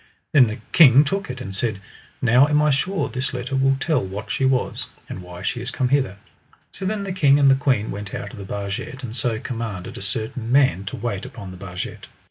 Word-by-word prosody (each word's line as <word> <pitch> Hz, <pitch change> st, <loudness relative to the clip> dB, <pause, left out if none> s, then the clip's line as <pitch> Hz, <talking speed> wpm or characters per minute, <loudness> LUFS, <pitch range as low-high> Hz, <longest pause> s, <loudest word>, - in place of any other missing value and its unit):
Then 135 Hz, -5 st, +6 dB
the 110 Hz, +2 st, -4 dB
king 140 Hz, -4 st, +8 dB
took 195 Hz, +6 st, -2 dB
it 125 Hz, 0 st, -5 dB
and 95 Hz, -6 st, -5 dB
said: 110 Hz, -1 st, -1 dB, 0.4 s
Now 125 Hz, +3 st, +6 dB
am 150 Hz, 0 st, +3 dB
I 150 Hz, 0 st, +4 dB
sure 150 Hz, +2 st, 0 dB
this 130 Hz, +2 st, -3 dB
letter 125 Hz, +2 st, -3 dB
will 135 Hz, 0 st, +3 dB
tell 155 Hz, -, +1 dB
what 100 Hz, +3 st, -6 dB
she 135 Hz, -, +1 dB
was, 130 Hz, -1 st, 0 dB, 0.2 s
and 95 Hz, -, -7 dB
why 90 Hz, 0 st, -10 dB
she 120 Hz, +4 st, -2 dB
is 125 Hz, -, -3 dB
come 130 Hz, -2 st, -1 dB
hither. 130 Hz, -7 st, +1 dB, 0.5 s
So 190 Hz, -, -6 dB
then 205 Hz, +1 st, -1 dB
the 195 Hz, -2 st, -3 dB
king 145 Hz, -6 st, +5 dB
and 140 Hz, -2 st, +6 dB
the -, -, +6 dB
queen 130 Hz, -6 st, +1 dB
went 105 Hz, 0 st, -6 dB
out 105 Hz, -, -5 dB
of -, -, -9 dB
the 95 Hz, -, -8 dB
barget, 100 Hz, +7 st, -5 dB
and 115 Hz, -2 st, -5 dB
so 120 Hz, -2 st, 0 dB
commanded 115 Hz, -8 st, -5 dB
a -, -, -10 dB
certain 110 Hz, +3 st, -4 dB
man 130 Hz, -9 st, +3 dB
to 100 Hz, -, -4 dB
wait 105 Hz, -3 st, -3 dB
upon 115 Hz, -7 st, -8 dB
the 90 Hz, -, -10 dB
barget. 90 Hz, -1 st, -6 dB
125 Hz, 230 wpm, -22 LUFS, 100-140 Hz, 0.5 s, king